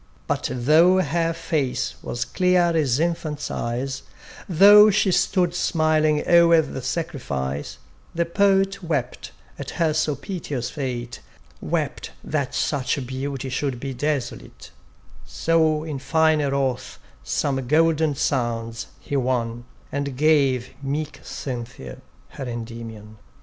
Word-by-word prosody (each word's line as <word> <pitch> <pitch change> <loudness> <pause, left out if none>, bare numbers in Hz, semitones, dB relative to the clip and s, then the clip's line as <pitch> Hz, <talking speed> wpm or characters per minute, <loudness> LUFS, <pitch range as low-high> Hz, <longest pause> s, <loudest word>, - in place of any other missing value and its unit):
But - - -1
though 160 +9 +4
her 165 0 0
face 155 -5 -2
was 120 0 -3
clear 180 -2 +2
as 140 -5 +2
infant's 160 -3 -2
eyes, 130 +3 -3 0.5
Though 205 +4 +8
she 195 -1 +2
stood 180 -1 +2
smiling 155 -3 +1
o'er 170 -1 +6
the 135 -2 -6
sacrifice, 70 - -4 0.4
The 170 0 +1
Poet 195 +2 +2
wept 145 -8 -3 0.3
at - - -5
her 160 -2 +2
so 155 -1 0
piteous 140 -6 -5
fate, 125 -4 -4 0.4
Wept - - -3
that 145 -4 -2
such 140 -2 -1
beauty 135 +1 -4
should 130 -1 -2
be 135 +1 -4
desolate: 135 - -4 0.5
So 160 -2 +1
in 150 -4 -5
fine 160 +2 +2
wrath 135 - -1 0.3
some 135 - -1
golden 160 0 +3
sounds 115 -4 -2
he 145 - -5
won, 120 -3 -1 0.3
And 140 -2 -3
gave 135 -5 +3
meek 145 +2 -3
Cynthia 120 - -7 0.3
her 135 - -7
Endymion. 115 -3 -7
145 Hz, 120 wpm, -23 LUFS, 125-165 Hz, 0.5 s, Though